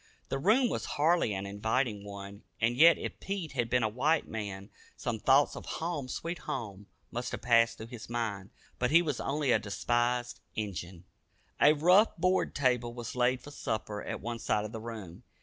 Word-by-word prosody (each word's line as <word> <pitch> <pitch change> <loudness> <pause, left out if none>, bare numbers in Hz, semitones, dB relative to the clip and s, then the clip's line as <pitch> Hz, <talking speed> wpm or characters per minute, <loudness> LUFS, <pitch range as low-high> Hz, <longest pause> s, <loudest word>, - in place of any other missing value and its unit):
The 135 - -1
room 225 - +4
was - - -2
hardly 160 -4 +3
an 95 +1 -4
inviting 105 +2 -1
one, 100 0 -8 0.2
and 115 +1 +2
yet 165 +5 +7
if - - -6
Pete 195 -5 -4
had 120 -3 -1
been 125 -1 +2
a - - +3
white 145 +8 +1
man 100 -2 -6 0.3
some 120 -3 -3
thoughts 135 +5 +4
of - - -8
"home, 160 -5 -3
sweet 170 +7 -4
home," 105 -9 -5 0.2
must 120 +1 -3
have - - -5
passed 115 -1 +4
through 110 - -7
his 115 -2 -8
mind. 110 -5 -3 0.3
But 125 - +2
he 170 +3 +6
was 150 -6 -2
only 140 -1 0
a - - +4
despised 120 +4 -1 0.2
"Injun." 90 -4 -5 0.6
A 150 - +8
rough 180 +9 +4
board 185 +2 +1
table 125 -3 +1
was 120 -1 -6
laid 125 0 +2
for 145 - -11
supper 110 -6 -3
at - - -5
one 115 +1 -4
side 105 -1 0
of 105 - -6
the 110 -1 -6
room. 110 -7 -8
120 Hz, 190 wpm, -31 LUFS, 105-145 Hz, 0.6 s, A